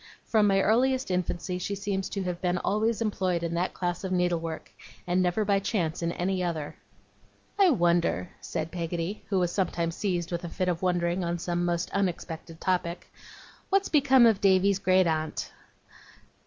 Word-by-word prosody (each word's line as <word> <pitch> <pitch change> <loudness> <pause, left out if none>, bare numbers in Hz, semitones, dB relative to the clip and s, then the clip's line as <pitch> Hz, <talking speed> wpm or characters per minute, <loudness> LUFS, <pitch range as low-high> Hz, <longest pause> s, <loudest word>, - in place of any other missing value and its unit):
From 215 -2 +3
my 195 -1 +3
earliest 255 +3 +2
infancy 180 0 -2
she 200 +3 -3
seems 195 -1 -2
to 195 - -3
have 180 -1 -4
been 180 -1 +1
always 220 +4 0
employed 185 -5 -1
in 170 0 -2
that 175 +2 -1
class 175 +1 -2
of 190 - -3
needlework, 170 -3 -1 0.3
and 180 +1 +1
never 185 +4 +1
by 200 -1 +3
any - - -1
chance 175 -6 -1
in 170 0 0
any 185 +1 -1
other. 160 -4 -3 0.8
'I 390 -2 +7
wonder,' 170 - +1
said 160 +1 -4
Peggotty, 170 +3 -3
who 195 - +1
was 175 -2 +1
sometimes 170 -3 -1
seized 180 -4 -2
with 170 0 -3
a 170 - -4
fit 180 +2 -1
of 175 -1 -2
wondering 175 0 0
on 170 0 -1
some 175 +1 -2
most 175 0 -1
unexpected 170 -4 -3
topic, 175 -2 -2 0.6
'what's 390 0 +2
become 270 -4 +5
of 220 -4 +4
Davy's 195 0 +4
great 185 -1 +4
aunt? 155 -1 -2
180 Hz, 175 wpm, -27 LUFS, 170-200 Hz, 0.8 s, I